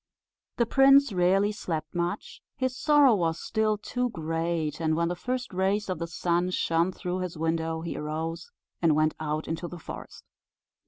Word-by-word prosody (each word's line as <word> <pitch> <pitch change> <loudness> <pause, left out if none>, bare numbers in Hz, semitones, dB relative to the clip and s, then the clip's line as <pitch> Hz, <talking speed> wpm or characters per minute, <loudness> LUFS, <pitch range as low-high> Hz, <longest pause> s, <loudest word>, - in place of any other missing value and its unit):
The 235 - +3
prince 275 0 +5
rarely 190 +3 +3
slept 165 -6 -4
much; 175 +4 -3
his 260 -3 -1
sorrow 290 -3 +5
was 170 -5 0
still 215 -1 0
too 245 +4 -2
great; 165 -3 -2
and 160 -1 +1
when 170 +1 +1
the 175 - -2
first 250 +4 -4
rays 195 +3 0
of 185 - -2
the 170 - -3
sun 175 +2 0
shone 170 0 +1
through 180 0 -4
his 180 -2 -4
window, 160 0 -1
he 170 - -4
arose, 160 +3 -4 0.3
and 165 -3 +4
went 155 0 +2
out 155 0 -2
into 165 +2 -3
the 175 - -8
forest. 160 - -9
175 Hz, 170 wpm, -27 LUFS, 165-210 Hz, 0.3 s, prince